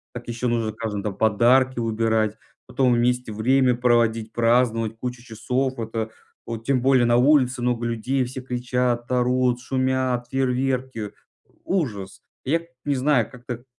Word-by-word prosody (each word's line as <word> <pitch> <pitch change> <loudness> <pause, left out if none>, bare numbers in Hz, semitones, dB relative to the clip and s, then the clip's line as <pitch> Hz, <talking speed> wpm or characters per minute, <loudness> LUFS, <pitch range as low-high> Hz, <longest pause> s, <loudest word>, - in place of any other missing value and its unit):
Так 120 0 -8
еще 120 +1 -2
нужно 115 -2 0
каждому 110 -2 -4
там 100 -3 -4
подарки 120 +4 +3
выбирать, 110 -1 0 0.3
потом 130 -3 +1
вместе 125 -1 +1
время 125 +3 +3
проводить, 115 -2 +1
праздновать 115 -1 +1
кучу 125 +1 -5
часов 125 +3 -2
вот, 115 0 -6
э. 110 0 -1 0.4
Вот 115 -1 -6
тем 130 -2 +1
более 130 -2 +4
на 120 0 +3
улице 130 -2 +3
много 120 -1 0
людей, 125 +3 -1
все 130 +2 -6
кричат, 125 -1 -2
орут, 125 0 +2
шумят, 130 -1 -1
фейерверки. 130 -4 -1 0.5
Ужас! 110 - -3 0.2
Я 165 +5 +1 0.2
не 145 -1 +1
знаю, 130 -4 +2
как-то 125 -1 -8
120 Hz, 145 wpm, -23 LUFS, 115-130 Hz, 0.5 s, более